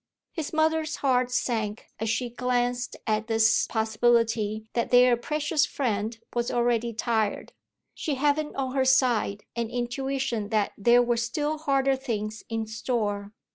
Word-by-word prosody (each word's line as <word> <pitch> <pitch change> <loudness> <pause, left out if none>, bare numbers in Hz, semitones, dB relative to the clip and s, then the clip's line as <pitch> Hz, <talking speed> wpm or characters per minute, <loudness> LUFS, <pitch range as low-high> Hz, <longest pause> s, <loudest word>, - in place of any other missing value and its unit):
His 320 -4 -4
mother's 315 0 +1
heart 255 -2 +1
sank 225 -4 -2
as 220 0 -1
she 240 +2 -1
glanced 245 0 -1
at 215 -1 0
this 225 -1 +3
possibility 220 -1 +1
that 235 - 0
their 250 0 +6
precious 300 +3 0
friend 220 -3 -2 0.2
was 240 0 -1
already 240 -1 +1
tired, 220 -2 -1 0.4
she 295 - -2
having 295 +2 0
on 265 -2 -2
her 270 -1 +2
side 245 -6 +2
an 235 -1 -2
intuition 245 -2 -2
that 215 -2 0
there 240 +4 +4
were 240 -1 +1
still 295 +7 -1
harder 275 -3 +2
things 220 -5 -4
in 225 -1 -2
store. 215 -3 -2
240 Hz, 140 wpm, -26 LUFS, 220-265 Hz, 0.4 s, their